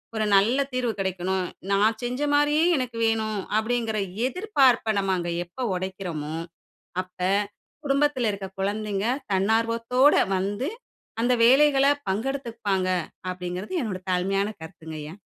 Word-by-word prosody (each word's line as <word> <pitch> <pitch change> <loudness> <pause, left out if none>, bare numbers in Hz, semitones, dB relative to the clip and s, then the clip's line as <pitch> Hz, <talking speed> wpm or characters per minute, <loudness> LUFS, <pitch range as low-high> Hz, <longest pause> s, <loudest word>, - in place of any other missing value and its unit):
ஒரு 215 - 0
நல்ல 230 +8 +4
தீர்வு 245 -3 0
கிடைக்கணும், 190 0 -1 0.3
நான் 215 +3 +3
செஞ்ச 250 +3 -3
மாரியே 295 +2 +3
எனக்கு 250 -3 -3
வேணும்." 220 -2 0 0.2
அப்படிங்கிற 225 0 0 0.3
எதிர்பார்ப்ப 265 - +2
நம்ம 195 -1 0
அங்க 175 0 -3
எப்போ 255 +9 -7
உடைக்கிறோமோ, 180 -5 -4 0.7
அப்ப 185 0 -28 0.7
குடும்பத்தில 275 -4 +2
இருக்கிற 195 -1 -6
குழந்தைங்க, 205 0 -1 0.3
தன்னார்வத்தோட 230 +6 +3 0.2
வந்து 205 - -2 0.5
அந்த 250 +1 +3
வேலைகள 275 +2 +5 0.2
பங்கெடுத்துப்பாங்க. 215 -5 -1 0.4
அப்படிங்கிறது 180 - -5
என்னுடைய 190 -6 -4
தாழ்மையான 195 +3 +1
கருத்துங்க 160 -1 -9
ஐயா. 150 +2 -8
215 Hz, 115 wpm, -25 LUFS, 190-250 Hz, 0.7 s, வேலைகள